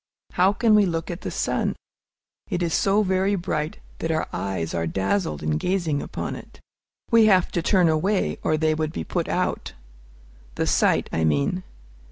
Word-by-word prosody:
How 185 +2 +3
can 220 +2 +2
we 210 -2 +5
look 165 0 -3
at 175 - -7
the - - -4
sun? - - -1 0.7
It 175 - -1
is 165 -2 -1
so 200 +2 +3
very 190 +1 +1
bright 155 -4 -3 0.2
that 165 - -2
our 160 -1 0
eyes 95 -4 -3
are 85 -1 -1
dazzled 95 -4 -1
in 75 0 0
gazing 170 -6 0
upon - - -5
it. - - -12 0.5
We 230 -2 +6
have 185 -4 +4
to 170 - -1
turn 180 +1 +3
away, 185 +6 0
or 155 - +1
they 155 0 +2
would 155 0 -2
be 80 - -3
put - - -2
out, - - -2 0.8
the - - 0
sight, - - +2
I 80 - 0
mean. 75 +3 +1
165 Hz, 180 wpm, -24 LUFS, -, 0.8 s, We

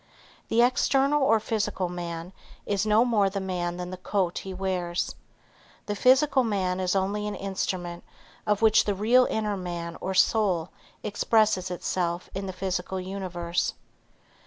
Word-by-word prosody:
The 235 +1 +4
external 270 +3 +3
or 225 -5 +4
physical 210 -4 -1
man, 175 0 -6 0.3
is 205 +1 0
no 215 +3 +5
more 210 -5 +3
the 195 +1 -3
man 175 -2 -3
than 180 0 -5
the 185 - -6
coat 185 -1 -1
he 195 - -7
wears. 185 -2 -2 0.7
The 205 - -2
physical 265 +4 +4
man 190 -5 -1
is 185 0 0
only 200 +2 0
an 210 - -3
instrument 185 -3 -3 0.4
of 210 +1 +1
which 220 - +5
the 205 - 0
real 240 +6 +4
inner 210 -2 -1
man 175 -2 -5
or 190 0 -3
soul 185 -4 +2 0.3
expresses 210 -2 +2
itself 175 -1 -2
in 195 0 -4
the - - -3
physical 185 0 -3
universe. 180 -2 -2
190 Hz, 150 wpm, -27 LUFS, 180-215 Hz, 0.7 s, no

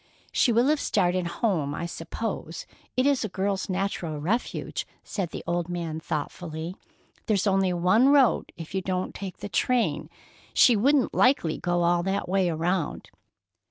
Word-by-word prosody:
"She 245 - +3
will 235 +2 +4
have 305 -1 +2
started 180 -6 +1
home, 170 -7 -1
I 170 - -3
suppose—it 170 +7 -5
is 280 -3 +3
a 215 - -2
girl's 195 +1 -2
natural 185 -4 -2
refuge," 195 +12 -2 0.2
said 190 -5 -3
the - - -7
old 175 0 -1
man 170 -3 -3
thoughtfully. 160 +2 -4 0.5
"There's 205 -2 +2
only 195 -2 +2
one 185 +9 +4
road 280 -4 +4
if 165 0 -8
you 190 - 0
don't 185 0 -2
take 190 -3 -7
the - - -6
train. 205 -3 0 0.5
She 245 - +6
wouldn't 270 +5 +3
likely 250 - +3
go 175 -1 0
all 175 0 +3
that 195 +2 -1
way 190 -1 +2
around." 165 0 -2
185 Hz, 155 wpm, -26 LUFS, 170-215 Hz, 0.5 s, She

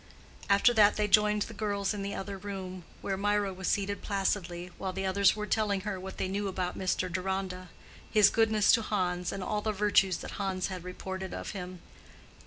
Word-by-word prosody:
After 200 +5 +5
that 210 -2 +6
they 210 -1 +1
joined 210 0 +4
the - - -8
girls 200 -1 -1
in 205 - -4
the 200 0 -3
other 200 +1 -5
room, 185 -2 -6 0.2
where 195 -1 -2
Mirah 205 -1 +1
was 185 0 -5
seated 200 0 0
placidly, 180 -3 -2
while 190 - -2
the 190 +1 -3
others 190 +1 +4
were 210 0 -3
telling 210 -3 +1
her 200 -2 -4
what 190 +1 -8
they - - -1
knew 200 +2 -2
about 185 -1 -2
Mr. 185 0 0
Deronda—his 185 +2 0
goodness 220 -2 +4
to 230 - +4
Hans, 180 -4 -1
and 195 - -4
all 210 +2 -1
the 215 - 0
virtues 200 -3 +3
that - - -7
Hans 190 -1 -1
had 185 -2 -6
reported 190 +1 -6
of - - -5
him. 180 -3 -7
195 Hz, 195 wpm, -30 LUFS, 185-205 Hz, 0.2 s, that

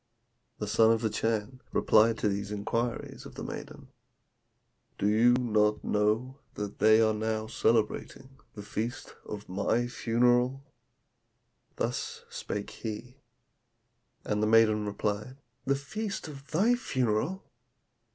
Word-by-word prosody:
The - - -3
son 115 0 +5
of 115 -1 +2
the 110 -2 0
Chan 115 +3 -2
replied 110 +1 +4
to - - 0
these 100 0 -2
inquiries 115 +3 -3
of - - -14
the - - -6
maiden, - - -8 1.1
'Do 100 - +1
you 115 +4 +5
not 105 -4 +2
know 110 +6 0 0.2
that 105 -1 -5
they 110 +1 +6
are 110 -1 +3
now 110 0 -1
celebrating 120 +4 -1 0.2
the 105 - -7
feast 115 +4 -4
of 105 0 -7
my 100 +5 0
funeral?' 125 +2 +2 1.1
Thus - - -3
spake 100 - -5
he; 115 +4 -7 1.1
and 105 0 0
the 110 - +2
maiden 110 -1 +4
replied, 105 +5 -3 0.3
'The 140 - +2
feast 195 +8 -4
of 140 -2 -10
thy 205 +10 +3
funeral! 130 - -1
115 Hz, 125 wpm, -29 LUFS, 105-125 Hz, 1.1 s, they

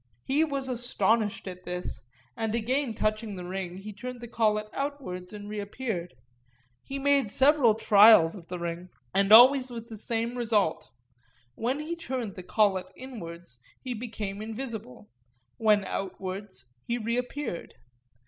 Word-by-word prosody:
He 285 +4 +2
was 280 -4 -2
astonished 230 -4 0
at 180 -1 -7
this, 180 -10 -4 0.3
and 225 0 -1
again 245 +1 0
touching 215 -1 -1
the 180 -1 -7
ring 185 -1 -4
he 210 +2 -8
turned 250 +4 -7
the 240 - -8
collet 215 -2 +1
outwards 270 -11 -4
and 205 -1 -8
reappeared; 205 - -4 0.7
he 275 - -6
made 275 -4 +2
several 265 -2 +4
trials 210 -5 +7
of 175 -4 -11
the 180 - -5
ring, 170 +1 -5 0.2
and 195 +1 +2
always 255 +3 +9
with 235 -1 -8
the 220 - -7
same 230 +2 -2
result—when 160 - -3
he 325 +3 -4
turned 255 - -4
the 185 - -8
collet 190 0 +1
inwards 170 - -8 0.2
he 255 -2 -4
became 215 -4 -5
invisible, 220 - -6 0.5
when 210 -3 +3
outwards 190 -6 -5 0.2
he 235 - 0
reappeared. 245 -2 -3
215 Hz, 140 wpm, -28 LUFS, 185-245 Hz, 0.7 s, always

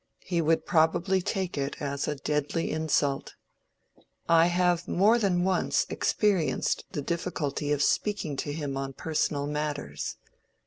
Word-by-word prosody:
He 175 -2 0
would 165 +1 +2
probably 170 +4 +2
take 190 -4 -2
it 140 +1 -3
as 140 -1 -2
a 150 - -1
deadly 150 +3 -1
insult. 150 -3 0 0.9
I 165 0 +6
have 175 -1 +1
more 215 +6 +4
than 180 -5 +1
once 190 0 +1
experienced 185 -10 +1
the 145 - -4
difficulty 155 -3 -2
of 145 -1 +2
speaking 200 -7 0
to 145 - -3
him 145 -3 -3
on 135 0 -4
personal 150 -1 -1
matters. 145 - -3
160 Hz, 135 wpm, -28 LUFS, 145-180 Hz, 0.9 s, I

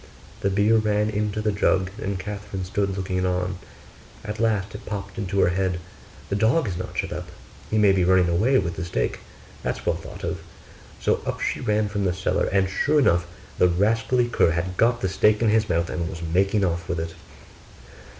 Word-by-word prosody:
The 100 - +1
beer 105 +3 +3
ran 105 0 +1
into 105 0 -1
the 105 - +2
jug 95 -2 +1
and 100 0 -2
Catherine 100 -1 -5
stood 100 0 -1
looking 95 -1 -1
on. 90 0 -1 0.7
At 105 +1 -5
last 110 -4 0
it 105 - -8
popped 100 -1 -5
into 100 -1 -1
her - - +4
head, 90 0 0 0.5
'The 100 - 0
dog 115 +7 +3
is 95 - -2
not 90 +1 -6
shut - - -1
up - - -6 0.4
he 110 - 0
may 105 -2 +6
be 95 -2 +2
running 90 0 +4
away 105 +11 +3
with 85 -7 -1
the 90 - -3
steak; 85 -8 -2 0.4
that's - - -3
well - - +2
thought - - -10
of.' - - -3 0.6
So - - +1
up - - -2
she - - -1
ran 105 -2 +1
from 100 -1 -2
the 90 - +1
cellar; 95 - 0
and 95 0 +3
sure 145 +10 +1
enough 85 -11 +3 0.3
the 90 - +6
rascally 115 +7 +2
cur 120 - +3
had 85 +3 -2
got 120 +4 +2
the 95 - +1
steak 105 +3 +3
in 115 - +3
his 110 0 +2
mouth, 85 -1 0
and 85 -2 -2
was 85 +1 -7
making 95 +5 +2
off 85 -1 -2
with 85 - -1
it. 80 0 -4
100 Hz, 205 wpm, -24 LUFS, 90-105 Hz, 0.7 s, may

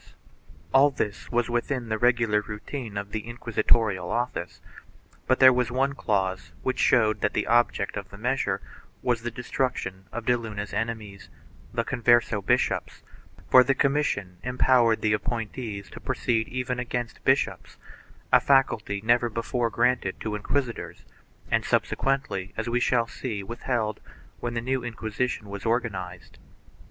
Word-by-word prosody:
All 135 +2 +7
this 105 -7 -4
was 120 -1 +1
within 120 0 -2
the 110 0 -1
regular 115 -3 +3
routine 105 +2 -6
of 100 0 -5
the 110 +1 -4
inquisitorial 115 -5 +1
office, 120 +2 -2 0.7
but 130 - +3
there 130 -1 +9
was 125 -1 +1
one 135 +2 +1
clause 95 - -1
which 130 - -1
showed 110 -2 +3
that - - +1
the - - 0
object 120 -4 +2
of 100 -1 -5
the 100 - -11
measure 125 +4 0 0.4
was 120 -2 +1
the 120 - -3
destruction 115 -5 -3
of 120 -1 -5
de 125 - +4
Luna's 105 -3 -5
enemies, 110 -4 -4 0.4
the - - 0
Converse 120 0 +3
bishops, - - 0 0.4
for 130 - +8
the 135 +2 +1
commission 135 -11 0
empowered 125 -2 +3
the 105 -1 +3
appointees 110 -1 -3
to - - -9
proceed 110 -2 0
even 125 0 -3
against 120 -1 -4
bishops - - +1 0.3
— - - -27
a - - +9
faculty 115 -7 +2
never 120 +1 +3
before 115 +1 -1
granted 120 -4 +1
to 110 - -3
inquisitors 115 +4 -3 0.5
and - - +2
subsequently, 135 -9 0
as - - -2
we 120 +1 +1
shall 120 -1 +2
see, 115 -3 -5
withheld 115 0 -2 0.4
when 120 0 -3
the 115 - 0
new 130 +2 -1
Inqui 110 -2 -6
sition 125 -1 -1
was 100 -1 -7
organized. 100 -7 -3
115 Hz, 150 wpm, -26 LUFS, 105-125 Hz, 0.7 s, there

